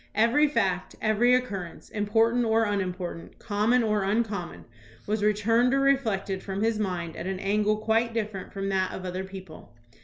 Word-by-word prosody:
Every 235 +8 +4
fact, 190 -9 -1
every 230 +3 +3
occurrence, 200 -9 -4
important 225 +3 +2
or 225 0 +2
unimportant, 185 -4 -4
common 225 +3 +1
or 210 -2 +1
uncommon, 205 -3 -2 0.4
was 210 0 -1
returned 225 +5 +3
or - - +2
reflected 220 -9 +1
from 195 +1 -3
his 225 -1 +1
mind 175 -5 -3
at - - -5
an 190 0 -2
angle 210 +2 +1
quite 225 +2 +1
different 215 -4 -4
from 195 0 -3
that 190 -1 0
of 185 - -6
other 185 +1 -3
people. 190 -7 -11
210 Hz, 160 wpm, -27 LUFS, 190-230 Hz, 0.4 s, Every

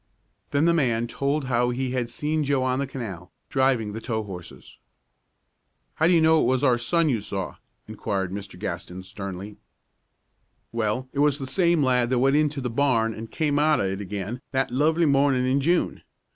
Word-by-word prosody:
Then 145 +2 +2
the 170 - +4
man 120 -8 +1
told 140 +5 -1
how 125 -1 +1
he 125 +1 -2
had 125 -2 -1
seen 155 +4 -1
Joe 140 -2 +1
on 130 0 0
the 140 - -1
canal, 100 -10 -7 0.2
driving 130 -6 +1
the 110 - -6
tow 110 -2 -2
horses. 90 -4 -11 1.1
"How 160 - +2
do 180 - +4
you 170 - +5
know 160 0 +5
it - - +2
was 130 +1 +1
our 125 -4 +4
son 165 +7 +1
you 120 -7 +1
saw?" 100 -2 -5 0.3
inquired 95 -2 -3
Mr. 100 -2 -7
Gaston, 90 -1 -5
sternly. 100 +1 -7 1.1
"Well, 115 +2 -1
it 140 - -3
was 145 -1 +3
the 135 - -5
same 170 +1 +2
lad 125 -2 +2
that 130 - +1
went 135 +3 +3
into 150 -2 +1
the 125 -2 -3
barn 115 -4 +2
an' 110 +1 -7
came 145 +2 0
out 150 -1 +3
of 100 - +1
it 95 +1 -2
again 100 +5 -5
that 135 -1 0
lovely 155 +6 +2
mornin' 140 -3 +3
in 135 +2 +2
June. 170 +5 +1
130 Hz, 190 wpm, -25 LUFS, 110-145 Hz, 1.1 s, you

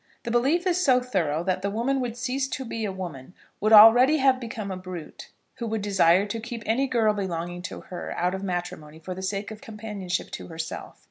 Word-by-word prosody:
The 235 - -3
belief 275 +10 +2
is 365 0 +2
so 255 -5 +5
thorough 175 -11 -1
that 185 0 -1
the 200 - -1
woman 240 +6 0
would 240 -2 -4
cease 260 +2 -1
to 265 -1 -5
be 225 -1 -3
a 200 - -2
woman, 180 -5 -8 0.2
would 215 +2 +1
already 235 +7 +8
have 265 -2 +3
become 225 -4 -5
a - - -3
brute, 185 -3 -9 0.3
who 235 -3 -4
would 220 -2 -2
desire 195 -2 +4
to 210 +2 -4
keep 230 0 -7
any 255 +5 +1
girl 225 -4 +2
belonging 175 -3 -4
to - - -8
her 180 - -7
out 180 +1 +1
of 190 - -4
matrimony 175 -5 -4
for 175 +3 -6
the 185 - -7
sake 195 +2 -3
of 215 -1 -9
companionship 210 -5 -5
to - - -7
herself. 160 -1 -6
210 Hz, 215 wpm, -26 LUFS, 180-240 Hz, 0.3 s, already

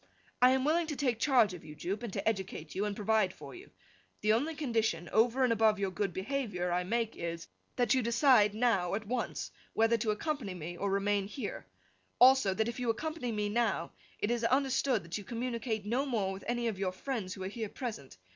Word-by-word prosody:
I 250 - +8
am 265 0 +1
willing 325 +2 +2
to 300 - -3
take 250 -5 0
charge 235 -7 +4
of 175 - -9
you, 150 - -10
Jupe, 190 +7 -3
and 235 -4 -5
to 195 - -3
educate 190 -7 -2
you, 200 +2 -1
and 205 -1 -2
provide 215 -2 +2
for - - -11
you. 370 +2 -12 0.5
The 215 0 +3
only 295 +8 0
condition 225 - 0
(over 240 +4 +3
and 245 -2 +4
above 220 -1 +3
your 195 -1 -1
good 195 +1 -1
behaviour) 190 -3 -2
I 180 +1 +1
make 225 +4 -1
is, 170 0 -5 0.3
that 245 -3 +2
you 260 - +3
decide 235 -3 +4
now, 205 -6 +2
at 215 +1 -4
once, 245 +3 -3 0.2
whether 225 +1 +3
to 220 0 -2
accompany 215 - -2
me 175 +1 -6
or 200 +3 -2
remain 200 0 +1
here. 215 +6 -6 0.5
Also, 250 -6 +6
that 220 +2 +1
if 235 +1 -4
you 245 -2 -1
accompany 280 +1 -2
me 210 -1 -1
now, 210 -6 0 0.3
it 210 - -1
is 240 -1 0
understood 265 -2 +2
that 170 +5 -5
you - - -8
communicate 230 -1 -3
no 250 +7 0
more 205 -7 0
with 195 - -9
any 240 0 0
of 210 -4 -3
your 185 -2 -1
friends 205 -3 -4
who 190 - -6
are - - -2
here 215 +1 -4
present. 215 - -6
220 Hz, 215 wpm, -32 LUFS, 195-245 Hz, 0.5 s, I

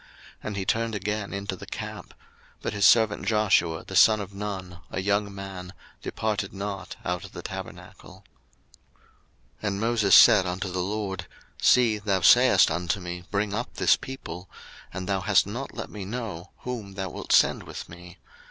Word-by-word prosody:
And 105 -2 -5
he 95 - -2
turned 115 +1 0
again 105 +1 -3
into 100 -1 -4
the - - -11
camp: - - -7 0.5
but - - -2
his 100 -2 +5
servant 110 -3 +3
Joshua, 95 -7 +2
the - - -7
son 110 -1 +6
of 100 -1 -7
Nun, 95 -3 -6
a - - -3
young 100 +1 0
man, 95 -2 -8 0.3
departed 105 -3 -2
not 100 0 -5
out 90 -1 -2
of - - -11
the - - -8
tabernacle. - - -9 1.4
02:033:012 110 - -2
And 100 -1 -1
Moses 110 -3 +4
said 105 -6 +8
unto 90 +2 -3
the 90 0 -2
LORD, 95 -2 -3 0.3
See, 115 -4 +4
thou 100 -2 0
sayest - - +6
unto 90 +4 -1
me, 90 0 -7
Bring 100 0 -1
up 120 +4 -4
this - - +4
people: 90 -9 -8 0.4
and 90 0 -6
thou 95 -1 0
hast 100 +1 +4
not 120 +7 -6
let 110 - -6
me 105 -2 -6
know 95 -4 -6
whom 110 -6 -6
thou 95 -1 -3
wilt - - -6
send - - +4
with - - -8
me. 90 +1 -13
100 Hz, 170 wpm, -26 LUFS, 95-105 Hz, 1.4 s, said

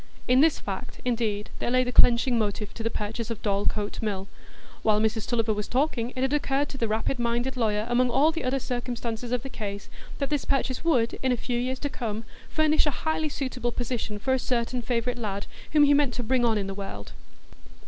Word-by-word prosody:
In 250 +1 +5
this 320 0 +4
fact, 200 +4 -6
indeed, 220 -4 -1
there - - -1
lay 255 +1 +4
the 245 - -2
clenching 240 0 +5
motive 210 -1 -2
to - - -7
the 225 - 0
purchase 220 +1 -4
of 230 -2 -5
Dorlcote 205 0 0
Mill. 200 -3 -2 0.5
While 215 -1 +3
Mrs 220 0 0
Tulliver 230 -2 +1
was 210 0 -3
talking, 250 -3 0
it 255 - -1
had 265 +2 +1
occurred 285 -1 +1
to 270 - -7
the 230 - +1
rapid 220 +4 -1
minded 240 +2 0
lawyer, 215 -3 +1
among 245 +1 +3
all 280 +6 +4
the 325 - -4
other 255 +2 +1
circumstances 240 -2 -3
of 250 -2 0
the - - -4
case, 200 -5 -6 0.3
that 275 0 -2
this 295 -2 +1
purchase 270 -1 0
would, 250 -9 +2
in 260 - +2
a 250 - +2
few 240 +1 -2
years 255 +2 -1
to 285 - -1
come, 225 -5 -3 0.3
furnish 310 0 +3
a 290 - -2
highly 315 -1 +1
suitable 260 -4 -2
position 235 -3 -3
for 260 +6 0
a 260 - +2
certain 245 0 -1
favourite 240 +1 -1
lad 200 -3 -3 0.3
whom 300 -1 +7
he 290 0 +6
meant 280 -4 +3
to 245 - -2
bring 250 +2 +2
on 225 -2 +3
in 200 - -1
the 195 - -4
world. 195 - -7
240 Hz, 220 wpm, -27 LUFS, 220-260 Hz, 0.5 s, whom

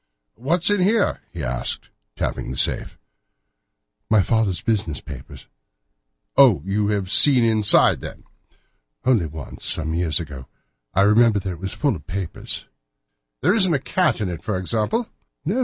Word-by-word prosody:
"What's 165 - 0
in 205 -2 +2
here?" 205 +3 +1
he 85 -4 -7
asked, - - -3 0.2
tapping - - -3
the 65 - -6
safe. - - 0 1.1
"My 110 - +4
stepfather's 105 -2 +1
business 100 -9 -1
papers." 70 -4 -11 0.9
"Oh! 120 - +5
you 100 +2 0
have 100 -3 -2
seen 125 +3 +6
inside, 110 -2 +4
then?" - - -9 0.8
"Only 115 -10 +2
once, 75 -1 -10
some 80 +2 0
years 85 -1 0
ago. 70 -6 -8 0.5
I 95 - +4
remember 105 +2 +4
that 95 - -4
it 85 - -8
was 95 +1 -4
full 140 -6 0
of 75 -4 -12
papers." 95 -2 -4 0.8
"There 180 +9 +3
isn't 190 -7 +3
a - - +3
cat 175 +3 0
in 105 - -2
it, 85 -3 -6
for 105 -4 -2
example?" 115 - -2 0.4
"No. 200 +11 -1
105 Hz, 155 wpm, -21 LUFS, 85-130 Hz, 1.1 s, seen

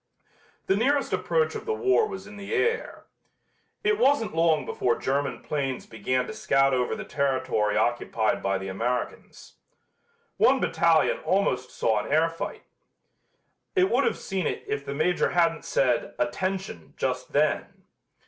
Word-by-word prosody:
The 190 - +2
nearest 275 +6 +1
approach 475 -2 +1
of - - -7
the 445 - 0
war 430 +1 +3
was 400 -2 -7
in 210 - -11
the 200 -1 -4
air. 460 +3 -1 0.8
It 425 +1 +2
wasn't 280 - +2
long 160 -3 +2
before 120 -2 0
German 140 +2 -2
planes 135 -4 -3
began 125 +4 -1
to - - -7
scout 135 0 +2
over 125 -1 0
the - - -7
territory 130 -6 0
occupied 115 -2 0
by 95 0 0
the 95 0 -6
Americans. 120 +6 -4 0.8
One - - +4
battalion - - +2
almost 130 - 0
saw 110 -2 0
an - - -7
air 160 +2 +3
fight. 165 - -6 1.1
It 375 +2 +3
would - - +3
have 465 - 0
seen 190 -4 -2
it - - -3
if 140 - -3
the 140 - -5
Major 175 +4 +1
hadn't 165 -2 +1
said 125 -3 0
"Attention!" 190 - -3
just - - -2
then. - - 0
155 Hz, 150 wpm, -26 LUFS, 125-210 Hz, 1.1 s, One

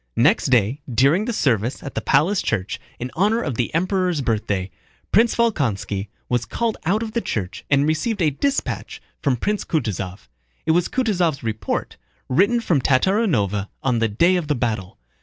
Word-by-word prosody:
Next 150 - +4
day 125 +2 +2
during 140 - +3
the 240 - -1
service 125 - 0
at 135 - -6
the - - -2
palace 165 +8 +3
church 105 -3 -2 0.2
in 125 +1 -5
honor 210 +6 +2
of 145 - -2
the 120 +1 -1
Emperor's 180 -2 +1
birthday, 100 -6 -1 0.4
Prince 230 +3 +4
Volkónski 115 - 0 0.2
was 120 -1 0
called 230 -2 -1
out 210 +5 +2
of 220 - -5
the 235 +1 -1
church 100 - -4
and 140 0 +4
received 160 +8 0
a 160 -4 +3
dispatch 275 - -2 0.2
from 140 -4 +2
Prince 210 - -1
Kutúzov. 100 - -3 0.4
It 160 - +3
was 175 +1 +2
Kutúzov's 180 - 0
report, 110 -1 -3 0.3
written 200 - +3
from 165 -11 +1
Tatárinova 130 - +1
on 125 -3 +1
the 115 - +2
day 170 - +3
of 170 -4 -3
the 150 - +1
battle. 110 -7 -2
145 Hz, 170 wpm, -22 LUFS, -, 0.4 s, Next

